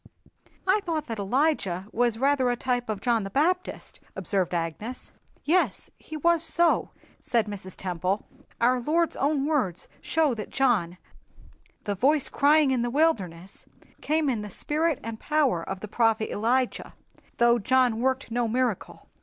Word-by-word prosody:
"I 385 +3 +3
thought 325 -6 -3
that 225 -5 -5
Elijah 200 - 0
was 240 -1 +1
rather 265 0 +2
a 245 - +1
type 245 -1 -2
of 210 -2 -3
John 235 -3 +1
the 195 - -5
Baptist," 355 - -1 0.2
observed 190 -4 -1
Agnes. 175 +9 -4 0.3
"Yes, 360 +5 +1
he 310 - -9
was 335 +2 +2
so," 335 +1 +2 0.3
said 230 -3 0
Mrs. 195 -3 -8
Temple. 185 +2 -2 0.3
"Our 250 +2 +3
Lord's 330 +6 +1
own 280 0 0
words 255 - -1
show 310 -4 +1
that 215 -2 -6
John, 210 -10 +1 0.9
'the 205 - -2
Voice 275 +8 +2
crying 295 0 +4
in 255 -2 +1
the 240 - -1
wilderness,' 195 - -1 0.3
came 310 0 +1
in 240 -6 0
the 210 - -7
spirit 305 - -1
and 225 0 -6
power 285 - +1
of 190 +2 -6
the 215 - -6
prophet 225 0 +1
Elijah, 245 +4 -1 0.4
though 235 0 +4
John 250 +1 +2
worked 260 -1 -1
no 240 0 0
miracle. 240 -3 -2
245 Hz, 155 wpm, -26 LUFS, 210-295 Hz, 0.9 s, crying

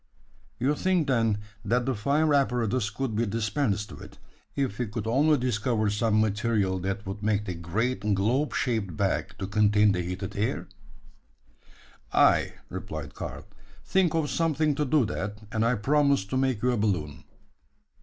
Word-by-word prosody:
"You 135 +4 +1
think, 180 -1 +1
then, 115 -5 +2 0.3
that 120 +3 +1
the 135 - 0
fire 145 +8 +1
apparatus 125 -5 +1
could 115 +1 -3
be 115 +1 +1
dispensed 105 0 -1
with, - - -11 0.4
if 130 -7 -1
we 125 - 0
could 105 +1 -5
only 145 +7 +3
discover 115 -3 0
some 110 +1 +2
material 105 -3 +1
that 100 +2 -3
would 95 +2 -6
make 105 -1 0
the 90 - -3
great 95 +8 -1 0.2
globe 120 +10 +1
shaped 105 - -1
bag - - -1
to - - -4
contain 105 +1 +3
the 90 -2 0
heated 90 +3 -5
air?" 110 +7 -1 1.4
"Ay," - - +4 0.2
replied 75 -2 -6
Karl; - - -7 0.4
"think 180 -4 +2
of 155 -3 0
something 155 -2 +1
to 150 +1 -1
do 140 -1 +3
that, 105 -1 -4
and 110 0 0
I 120 +2 +2
promise 140 +1 +2
to 100 - -4
make 130 -4 0
you 125 - +3
a 120 - 0
balloon." 80 -8 -1
110 Hz, 160 wpm, -27 LUFS, 100-135 Hz, 1.4 s, Ay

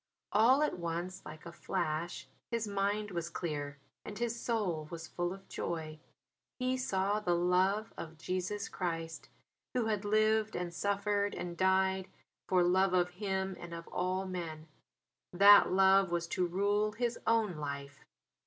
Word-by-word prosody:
All 250 +7 +5
at 300 - -1
once 175 +3 -4
like 155 +1 -10
a 170 - -7
flash 155 -3 -3 0.2
his 230 -2 -1
mind 205 +1 -1
was 170 -1 -3
clear, 145 -5 -4 0.3
and 205 - -7
his 235 -1 -1
soul 185 -10 -1
was 165 -2 -7
full 175 +1 -2
of 195 +1 -10
joy. 155 -2 -4 0.6
He 255 0 0
saw 205 -5 0
the 175 -5 +1
love 185 +5 +2
of 160 0 -7
Jesus 185 +5 -3
Christ 165 -2 -4 0.5
Who 245 -3 +2
had 215 -2 -1
lived 215 +1 +2
and 175 -1 -3
suffered 200 +2 0
and 175 -1 -5
died 190 +1 +2 0.4
for 180 -1 +4
love 185 +1 +3
of 180 0 +2
him 190 0 -2
and 170 -1 -7
of 165 0 -9
all 185 +1 -1
men; 165 -4 -5 0.7
that 200 +2 +8
love 190 0 +5
was 170 0 -1
to 180 -1 0
rule 205 +4 +1
his 235 +1 -2
own 220 -7 +2
life! 140 -1 -6
185 Hz, 155 wpm, -33 LUFS, 170-205 Hz, 0.7 s, that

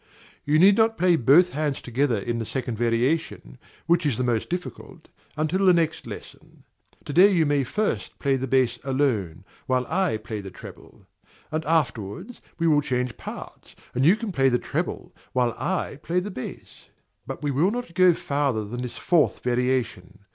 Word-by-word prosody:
You 150 +1 +3
need 195 +4 +6
not 225 0 +3
play 180 0 +4
both 160 +7 +5
hands 150 -2 -1
together 125 0 0
in 115 +4 -3
the 115 - -3
second 125 -3 -3
variation, 120 - -1 0.3
which 170 +1 +2
is 140 -7 0
the 125 - -1
most 120 -3 -1
difficult, 180 -1 -7 0.3
until 155 +6 0
the 185 -2 +6
next 165 -2 -1
lesson. - - -11 0.4
To 145 - -5
day 190 +6 +7
you 170 -4 +3
may 145 -1 +2
first 130 - -2
play 140 -1 +1
the 130 0 -3
bass 125 -2 +2
alone, 125 - -1 0.2
while 130 -1 +1
I 180 -7 0
play 110 -1 -6
the 100 - -8
treble; - - -13 0.5
and 155 +1 -2
afterwards 145 - -2 0.2
we 165 - -1
will 150 -2 +4
change 125 -3 -2
parts, - - -10 0.2
and 125 - 0
you 170 +8 +6
can 220 -1 -5
play 135 -5 +3
the 125 - +2
treble - - -4 0.2
while 125 -2 +1
I 185 -6 -3
play 175 +3 0
the 200 +3 -5
bass. 130 - -9 0.4
But 135 +2 -6
we 145 - 0
will 150 +8 +2
not 240 -5 -5
go 185 -1 +5
farther 140 -9 -1
than 120 +4 -6
the 125 - -3
fourth 165 +5 +1
variation. 120 -6 -1
140 Hz, 180 wpm, -24 LUFS, 120-170 Hz, 0.5 s, day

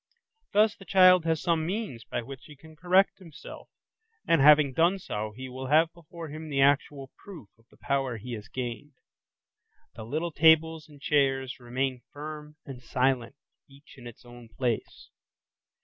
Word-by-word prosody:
Thus 215 +1 +3
the - - -15
child 185 -3 +5
has 160 -2 0
some 165 -2 +1
means 180 - -4
by - - -4
which 135 +2 -11
he 150 - -13
can 160 +3 -17
correct 185 +6 +2
himself, 165 -6 -12 0.6
and 165 - +3
having 145 -1 +6
done 170 +7 +2
so 110 - -5
he 130 0 -7
will 130 +1 -7
have 160 +4 +3
before 170 -1 -11
him 155 +1 -8
the 140 -2 -2
actual 140 -1 +1
proof 160 - -12
of 115 - -28
the - - -23
power 135 -4 -2
he 120 +3 -8
has 105 -2 -8
gained: 125 +3 -6 1.0
the 110 - -9
little 155 +9 -3
tables 160 0 +3
and 145 -1 -16
chairs 135 -3 0
remain 125 +1 -3
firm 150 0 -9
and 135 -3 -9
silent 125 0 -1 0.3
each 140 +1 -18
in 125 -3 -12
its 120 +1 -14
own 120 -1 -14
place. 120 0 -4
145 Hz, 165 wpm, -27 LUFS, 125-160 Hz, 1.0 s, having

